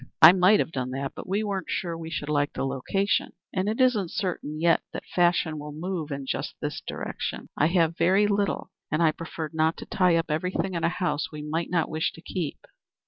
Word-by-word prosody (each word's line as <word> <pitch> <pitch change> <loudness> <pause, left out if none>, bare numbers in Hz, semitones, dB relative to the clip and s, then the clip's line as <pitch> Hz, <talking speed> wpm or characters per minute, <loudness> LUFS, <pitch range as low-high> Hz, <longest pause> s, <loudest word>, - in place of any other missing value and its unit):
I 160 +1 +11
might 185 +3 +5
have - - 0
done 130 -3 -2
that, 135 0 -3
but - - -8
we 200 +3 +1
weren't 200 -3 -3
sure 170 -2 -2
we 165 -1 -6
should 145 -2 -4
like 145 -1 +1
the - - -2
location, 140 +10 0 0.2
and 190 +2 0
it 220 - -2
isn't 235 -8 +3
certain 165 -6 -3
yet 165 0 +4
that - - -6
fashion 175 -3 +2
will 150 0 -7
move 165 0 -3
in 140 -1 -4
just - - -3
this - - -4
direction. - - -5
I 150 - +3
have 170 -1 +2
very 190 +5 +4
little, 205 -1 0 0.2
and 155 +3 +2
I 160 - +5
preferred 160 -1 -6
not 160 +1 +2
to - - -7
tie 180 -2 +3
up 165 -1 0
everything 180 +4 -1
in 170 -1 -2
a 165 - +4
house 180 -4 -1
we 150 -1 -7
might 160 +3 -2
not 170 -3 +1
wish 160 0 -1
to 165 - -13
keep." 170 -6 -4
165 Hz, 220 wpm, -26 LUFS, 155-185 Hz, 0.2 s, I